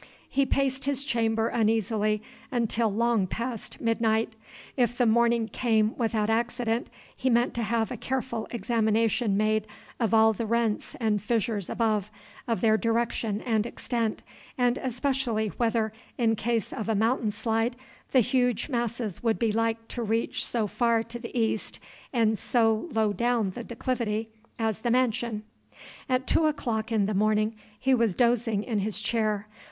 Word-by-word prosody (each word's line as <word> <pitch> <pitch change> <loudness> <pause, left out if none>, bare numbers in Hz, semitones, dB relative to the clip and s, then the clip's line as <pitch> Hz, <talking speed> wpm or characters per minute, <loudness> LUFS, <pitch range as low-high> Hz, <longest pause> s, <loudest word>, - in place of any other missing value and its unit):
He 275 0 +1
paced 270 -1 0
his 280 -1 0
chamber 225 -3 +1
uneasily 215 -1 +1 0.3
until 230 -2 +1
long 225 -2 +2
past 230 +3 -4
midnight. 225 -1 +1 0.4
If 245 -2 +1
the 245 - +3
morning 235 0 +3
came 220 -2 +1
without 220 -3 0
accident, 235 +1 0 0.3
he 260 - 0
meant 240 0 +3
to 235 - -2
have 225 +1 0
a 245 - -4
careful 250 -2 -3
examination 225 -2 +1
made 215 0 +1 0.3
of 225 -4 +1
all 220 0 +5
the 225 +2 -3
rents 230 -1 0
and 215 -3 +1
fissures 215 -3 -1
above, 215 -3 0 0.4
of 230 -2 0
their 220 -2 +4
direction 230 -2 0
and 225 -2 0
extent, 230 -2 -2 0.3
and 245 0 +2
especially 250 -3 -1
whether, 225 -1 0 0.2
in 225 -2 +2
case 230 -1 -1
of 220 0 -4
a 220 - +2
mountain 225 +2 +2
slide, 225 +3 0 0.4
the 260 - +6
huge 245 +1 +1
masses 235 - -2
would 225 -2 +1
be 230 -2 +1
like 225 +1 -1
to 240 - -4
reach 225 +1 0
so 230 -3 0
far 230 +2 +1
to 230 +1 -8
the 235 +1 -4
east 220 -1 -1 0.3
and 220 -4 +2
so 225 +5 +1
low 220 -3 +1
down 235 -3 +1
the 240 +5 -7
declivity 230 -2 -2 0.3
as 220 -3 -1
the 240 - -1
mansion. 235 -3 +1 0.7
At 255 0 +1
two 315 - +3
o'clock 235 -7 -2
in 215 -3 +2
the 210 - -1
morning 215 +2 +2 0.3
he 265 0 +2
was 230 -7 +2
dozing 235 -3 +2
in 220 -3 -1
his 205 +1 -1
chair. 215 -1 0
230 Hz, 155 wpm, -27 LUFS, 220-240 Hz, 0.7 s, the